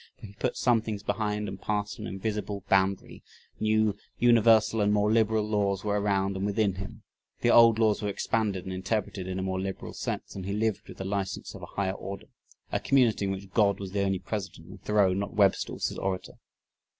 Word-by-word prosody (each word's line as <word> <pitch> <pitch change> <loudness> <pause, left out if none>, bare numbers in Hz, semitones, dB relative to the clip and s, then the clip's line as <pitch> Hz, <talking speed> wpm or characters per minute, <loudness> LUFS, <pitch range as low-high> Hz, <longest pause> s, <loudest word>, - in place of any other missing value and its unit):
"...for - - -11
he 100 - -11
put 120 +4 -2
some 120 -3 +3
things 105 -2 -5
behind 105 -1 -1
and 95 -1 -7
passed 105 0 -2
an - - -5
invisible 105 0 -3
boundary; 95 0 +1 0.4
new, 110 -1 +2 0.2
universal, 115 -2 +5
and 105 0 +3
more 105 0 +2
liberal 110 -1 +2
laws 100 -2 0
were 105 -1 0
around 100 -1 +1
and 95 - -3
within 100 0 +1
him, 105 +4 -8 0.4
the 120 - +4
old 115 -2 +7
laws 110 -2 +2
were 105 - -1
expanded 100 -2 -1
and 95 - -4
interpreted 95 0 -2
in 95 0 -3
a 95 - -2
more 95 0 -2
liberal 95 0 -5
sense - - -4
and 95 -1 -5
he 100 - -2
lived 110 -1 -1
with - - -11
the 95 - -5
license 95 -1 -3
of - - -10
a - - -7
higher 100 -1 +1
order" 100 0 -7 0.5
a - - +1
community 120 -7 +3
in 95 - 0
which 95 0 -6
"God 100 -3 +3
was 95 -2 -6
the 100 0 0
only 95 -1 +1
President" 95 -1 -6
and - - -12
"Thoreau 105 -3 +3
not 100 +2 -3
Webster 100 -2 +3
was - - -1
His - - -7
Orator." 95 -1 -3
100 Hz, 210 wpm, -28 LUFS, 95-110 Hz, 0.5 s, old